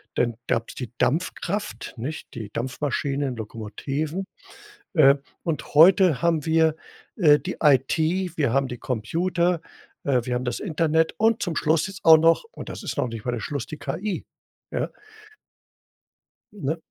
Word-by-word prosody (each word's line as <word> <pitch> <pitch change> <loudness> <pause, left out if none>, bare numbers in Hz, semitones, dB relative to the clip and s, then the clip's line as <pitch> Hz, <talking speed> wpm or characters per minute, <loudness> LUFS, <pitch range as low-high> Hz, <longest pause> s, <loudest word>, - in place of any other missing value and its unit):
dann 120 -1 +1
gab's 115 0 -1
die 125 -4 -6
Dampfkraft, 180 +9 -2
nicht? 135 +8 -6
Die 110 -5 -6
Dampfmaschinen, 135 +2 -2
Lokomotiven. 135 - -4 0.7
Äh, 140 -5 +7 0.3
und 165 -3 -3
heute 175 -1 +6
haben 165 -3 +1
wir, 160 -1 +3 0.4
äh, 150 -6 +6
die 185 - -5
IT, 160 +6 +2
wir 140 -7 +1
haben 135 0 +2
die 125 - -5
Computer, 170 - 0 0.5
äh, 130 -3 +2
wir 125 0 -2
haben 125 +1 -2
das 125 - -2
Internet 160 -3 +1
und 225 +1 +2
zum 170 -4 -2
Schluss 160 +4 +2
jetzt 195 0 -10
auch 160 -1 +10
noch- 165 - +3
und - - -9
das - - -7
ist - - -4
noch - - +1
nicht 115 -2 -7
mal 125 - 0
der 120 - -2
Schluss- 140 +1 -3
die 155 - -7
KI, 170 +8 -4 0.5
ja. - - -1 1.6
Ne? 160 -6 -2
155 Hz, 155 wpm, -24 LUFS, 130-170 Hz, 1.6 s, auch